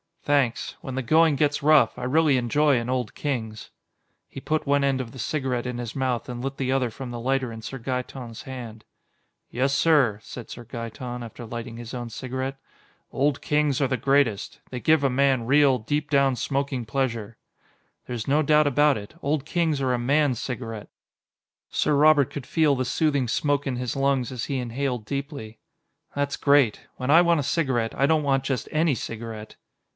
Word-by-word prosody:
"Thanks. 140 -5 0
When 130 - -6
the 135 - -1
going 160 +3 +4
gets 145 +1 +1
rough, 155 -1 +5
I - - -6
really 145 +1 +3
enjoy 140 +3 +2
an 120 +1 -5
Old 125 -3 -1
Kings." 115 -7 -4 0.6
He - - -9
put 155 +3 -1
one 140 0 +2
end 135 -1 +1
of 120 -3 -7
the 130 - -11
cigarette 130 -3 -2
in 125 -1 -3
his 120 -2 -5
mouth 130 -3 -1
and 120 0 -5
lit 135 0 -4
the 130 -1 -1
other 130 -2 +1
from 125 +2 -7
the 120 - -5
lighter 130 0 0
in 115 0 -8
Sir 135 +4 -6
Gaeton's 125 -1 -5
hand. 120 -4 -8 0.7
"Yes, 135 +3 0
sir," 140 -9 +3
said 125 - -9
Sir 120 - -8
Gaeton, 120 +1 -6
after 120 +1 -9
lighting 115 0 -6
his 120 0 -8
own 120 -2 -5
cigarette, 130 +3 -4 0.5
"Old 140 +1 0
Kings 150 -2 +1
are 135 - +3
the 130 -1 -1
greatest. 130 -4 +1
They 125 - -5
give 155 +2 +3
a 135 - +3
man 130 -2 +2
real, 140 0 +4
deep 145 +6 -2
down 140 -2 +3
smoking 135 0 -2
pleasure." 115 -3 -2 0.7
"There's 120 -3 -4
no 145 +3 +3
doubt 150 0 +4
about 145 0 +3
it, 105 +8 -10
Old 145 -1 -1
Kings 160 -3 0
are 130 -1 +1
a 125 - 0
man's 135 0 +2
cigarette." 115 -4 -5 0.8
Sir 150 - +1
Robert 145 -2 +5
could 140 -4 -6
feel 155 -4 +3
the 130 0 -1
soothing 140 -1 +1
smoke 145 +4 0
in 130 - -1
his 125 +1 -3
lungs 135 -2 +1
as 125 -2 -4
he 140 - -2
inhaled 125 -1 -3
deeply. 140 -5 -5 0.6
"That's 145 0 -1
great. 140 -6 +3
When 130 +2 -1
I 165 +3 +8
want 170 -2 +3
a - - -1
cigarette, 130 -7 0
I 135 - +2
don't 155 +1 +2
want 135 -2 +1
just 135 -4 -2
any 155 -2 +2
cigarette." 110 -2 -7
130 Hz, 190 wpm, -25 LUFS, 120-145 Hz, 0.8 s, I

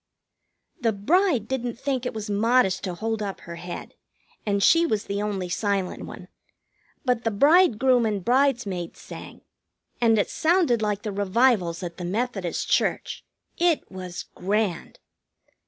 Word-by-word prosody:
The 225 -2 +1
bride 270 - +2
didn't 245 -2 -3
think 260 -1 -2
it - - -4
was 215 0 -4
modest 210 -1 +2
to 180 -2 -3
hold 220 +3 -2
up 200 -2 -4
her 170 0 -9
head, 175 +1 -7 0.5
and 200 -1 +1
she 335 0 +6
was 215 -11 0
the 200 +1 -3
only 200 -3 -2
silent 195 0 -2
one. - - -10 0.8
But 250 -2 +1
the 225 - +1
bridegroom 255 - +4
and 205 -4 -2
bridesmaids 240 -9 +1
sang, - - -10 0.6
and 225 -2 +4
it 205 - 0
sounded 320 -8 +2
like 210 -1 -1
the 210 - -3
revivals 200 -3 +2
at 170 -1 -6
the 180 - -6
Methodist 195 -2 -2
church. - - 0 0.4
It 340 -2 +1
was 185 -2 -6
grand. 200 -2 -2
215 Hz, 145 wpm, -25 LUFS, 195-250 Hz, 0.8 s, she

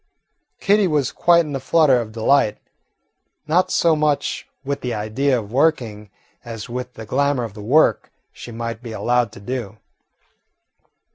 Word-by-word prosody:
Kitty 205 -1 +3
was 150 -5 0
quite 170 -1 +3
in 145 -2 -5
a - - -2
flutter 135 -2 +3
of 110 -2 -8
delight; 110 0 +2 0.9
not 170 +4 +2
so 165 -2 +3
much 150 -2 -1 0.2
with 140 +1 -3
the 125 -1 -3
idea 120 +6 0
of 105 -3 -6
working 120 -7 0 0.3
as 115 -3 -7
with 125 +1 -6
the 110 - -8
glamour 140 +2 0
of 110 -4 -6
the 105 - -10
work 135 +10 +2 0.2
she 120 - -10
might 115 0 -5
be 115 -2 -8
allowed 120 -1 0
to - - -11
do. 110 -1 -5
125 Hz, 155 wpm, -21 LUFS, 115-145 Hz, 0.9 s, Kitty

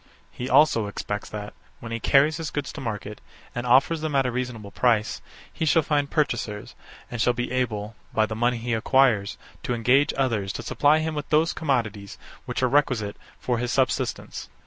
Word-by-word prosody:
He 125 +1 -5
also 115 -9 +4
expects 105 0 -5
that, 105 -1 -7 0.3
when 115 - -8
he 115 - -2
carries 145 +6 +4
his 165 -2 -4
goods 145 -1 -4
to 155 - -7
market, 105 -3 -5 0.3
and 120 0 -4
offers 140 +6 +4
them 155 -2 -2
at 135 -1 +3
a 125 - 0
reasonable 120 -4 -4
price, 115 -1 +1 0.3
he - - -3
shall 160 +1 +4
find 145 -1 0
purchasers, 115 -8 -2 0.4
and 120 -2 -3
shall 125 - +3
be 120 0 -3
able, 110 -4 -2 0.2
by 110 - +2
the 110 - -5
money 120 +2 +1
he 120 +1 -3
acquires, 115 -3 +2 0.2
to 125 - -2
engage 125 +5 +3
others 115 -8 0
to - - -6
supply 145 +5 +3
him 160 0 -2
with 150 -2 -5
those 155 +2 +3
commodities 115 -9 -2 0.3
which - - -3
are - - +5
requisite 125 -6 +1 0.2
for 120 -2 -1
his 120 0 -2
subsistence. 130 0 -1
125 Hz, 190 wpm, -25 LUFS, 110-140 Hz, 0.4 s, are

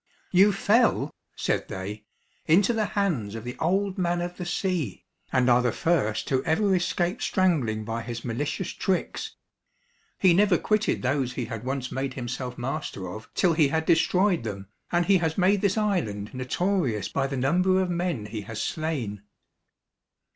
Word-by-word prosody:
"You 195 +3 +6
fell," 220 +4 +2 0.2
said - - -1
they, 105 +3 -6 0.4
"into 195 +8 +4
the 220 -2 +1
hands 135 - 0
of 115 - -6
the 125 +1 -6
old 190 +4 0
man 175 -1 +1
of 175 0 -4
the 180 - -5
sea, 175 - -2 0.3
and 130 -1 +2
are 125 0 +5
the 125 -1 +1
first 135 -11 0
who 130 0 +2
ever 195 +4 +2
escaped 175 +2 0
strangling 140 - +1
by 115 +1 -3
his 120 0 -6
malicious 140 +9 -2
tricks. 190 -2 -2 0.8
He 185 -3 +5
never 195 0 +4
quitted 215 -4 0
those 130 -1 0
he 125 -2 -3
had 115 -1 -6
once 130 0 -3
made 135 0 -3
himself 125 0 -4
master 125 - -4
of 110 +5 -9
till 180 -3 +3
he 155 -2 +4
had 160 +3 -1
destroyed 180 - +3
them, 100 -3 -6 0.2
and 175 0 +2
he 195 +1 +4
has 160 -2 -1
made 190 +1 +3
this 200 0 +1
island 160 - -1
notorious 130 - 0
by 135 -1 -1
the 135 0 -4
number 180 +8 +3
of 185 -1 0
men 170 -10 -1
he 105 0 -5
has 105 +2 -7
slain." 135 -11 -3
155 Hz, 170 wpm, -26 LUFS, 120-185 Hz, 0.8 s, You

